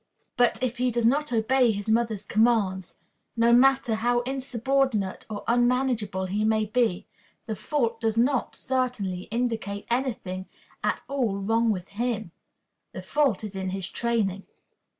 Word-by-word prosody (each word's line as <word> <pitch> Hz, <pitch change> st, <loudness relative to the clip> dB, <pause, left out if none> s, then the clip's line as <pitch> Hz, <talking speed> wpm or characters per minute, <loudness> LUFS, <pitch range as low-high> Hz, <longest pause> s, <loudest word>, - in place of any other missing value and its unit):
But 245 Hz, -1 st, +3 dB
if 255 Hz, 0 st, -1 dB
he 250 Hz, +1 st, +1 dB
does 235 Hz, -1 st, 0 dB
not 290 Hz, +5 st, +2 dB
obey 245 Hz, +2 st, +3 dB
his 205 Hz, -1 st, -2 dB
mother's 220 Hz, -2 st, +1 dB
commands 205 Hz, -5 st, +1 dB, 0.4 s
no 235 Hz, +1 st, +4 dB
matter 265 Hz, -1 st, +4 dB
how 240 Hz, +2 st, +1 dB
insubordinate 260 Hz, -4 st, -1 dB
or 205 Hz, -2 st, -5 dB
unmanageable 240 Hz, -5 st, +1 dB
he 200 Hz, +3 st, -1 dB
may 215 Hz, 0 st, +2 dB
be 220 Hz, -4 st, 0 dB, 0.4 s
the 220 Hz, -, -3 dB
fault 230 Hz, +1 st, -1 dB
does 225 Hz, -1 st, 0 dB
not, 250 Hz, +2 st, +1 dB
certainly, 240 Hz, -9 st, -2 dB
indicate 225 Hz, -4 st, -2 dB
any 255 Hz, +1 st, +1 dB
thing 185 Hz, -2 st, -7 dB, 0.4 s
at -, -, 0 dB
all 245 Hz, -8 st, -1 dB
wrong 225 Hz, +3 st, +1 dB
in 180 Hz, -, -9 dB
him. 220 Hz, -2 st, -3 dB, 0.6 s
The -, -, -7 dB
fault 275 Hz, -8 st, +1 dB
is 205 Hz, -2 st, -6 dB
in 190 Hz, -1 st, -3 dB
his 190 Hz, -1 st, -3 dB
training. 210 Hz, -5 st, -1 dB
230 Hz, 150 wpm, -26 LUFS, 205-250 Hz, 0.6 s, no